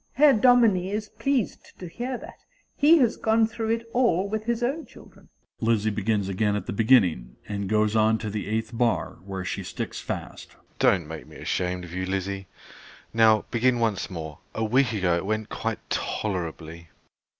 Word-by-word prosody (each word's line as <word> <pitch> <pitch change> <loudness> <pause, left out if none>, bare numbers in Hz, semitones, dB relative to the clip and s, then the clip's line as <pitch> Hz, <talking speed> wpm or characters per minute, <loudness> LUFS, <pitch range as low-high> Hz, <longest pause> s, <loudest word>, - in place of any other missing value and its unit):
Herr 290 0 +6
Dominie 220 -6 +4
is 210 +1 -3
pleased 275 -6 -2
to 180 - -8
hear 245 +8 -4
that: - - -12 0.4
he 310 +3 +6
has 245 -7 +2
gone 225 0 +3
through 220 0 -4
it 230 0 -1
all 230 -7 +2
with 215 +1 -3
his 235 0 -1
own 280 +7 -1
children. - - -17 0.3
(Lizzie 110 -2 +1
begins 105 -1 0
again 105 +2 0
at 100 -2 -3
the - - -4
beginning, 100 - +3
and 100 -2 -3
goes 105 0 +2
on 110 0 +4
to 110 -2 -5
the 105 0 -4
eighth 110 +2 -2
bar, 115 -6 0
where 95 -1 -5
she - - -3
sticks - - -5
fast.) - - -6
SHEPARD. - - -28
Don't 90 -5 +3
make 80 0 -8
me - - -14
ashamed 90 0 -2
of 85 -1 -10
you, 95 0 -3
Lizzie. 95 0 -3 0.7
Now 110 -1 +4
begin 120 +1 +2
once 110 -4 0
more: 80 -5 -7 0.2
a 110 - -1
week 125 +3 +2
ago 95 -5 +1
it 85 - -4
went 110 0 -2
quite - - -4
tolerably. 85 -4 -3
110 Hz, 185 wpm, -25 LUFS, -, 0.7 s, Herr